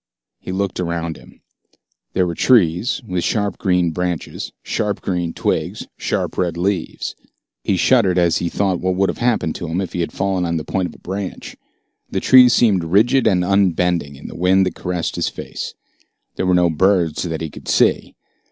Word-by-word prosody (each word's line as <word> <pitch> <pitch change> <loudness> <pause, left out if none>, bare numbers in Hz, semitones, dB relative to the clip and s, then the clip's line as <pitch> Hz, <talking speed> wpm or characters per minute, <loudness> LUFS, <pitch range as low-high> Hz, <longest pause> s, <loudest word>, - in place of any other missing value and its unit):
He - - -7
looked 95 0 -2
around 85 -2 -2
him. - - -17 0.7
There 95 - +2
were 85 - -2
trees, 105 +3 +2
with 90 -4 -2
sharp 105 -3 -1
green 90 -3 +2
branches, 90 -2 -3
sharp 105 -3 -2
green 90 -3 -2
twigs, - - -2
sharp - - -2
red 85 -2 0
leaves. 90 0 -2 0.5
He 95 - +1
shuddered 95 -3 +3
as 85 -2 +3
he 85 - -1
thought 95 -1 0
of - - -11
what 95 +1 0
would 95 +1 +2
have - - -12
happened 120 -9 +1
to 85 - -5
him 80 +3 -2
if 95 -3 -4
he - - -3
had 85 - -1
fallen 95 -1 -1
on 85 -1 -1
the 80 - -3
point 95 +2 -1
of - - -12
a - - -14
branch. 95 +1 -6 0.5
The - - -1
trees 125 -1 +7
seemed 100 -8 +3
rigid 110 +10 +3
and 90 -4 +2
unbending 90 -6 +1
in 70 - -14
the - - -8
wind 95 +2 +3
that 90 - -2
caressed 90 -1 -3
his - - 0
face. - - -7 0.6
There 95 - -1
were 90 - +4
no 90 -1 +3
birds 85 -1 +2
that 80 -3 -3
he 80 -2 -4
could - - -12
see. - - +2
90 Hz, 195 wpm, -19 LUFS, 85-100 Hz, 0.7 s, trees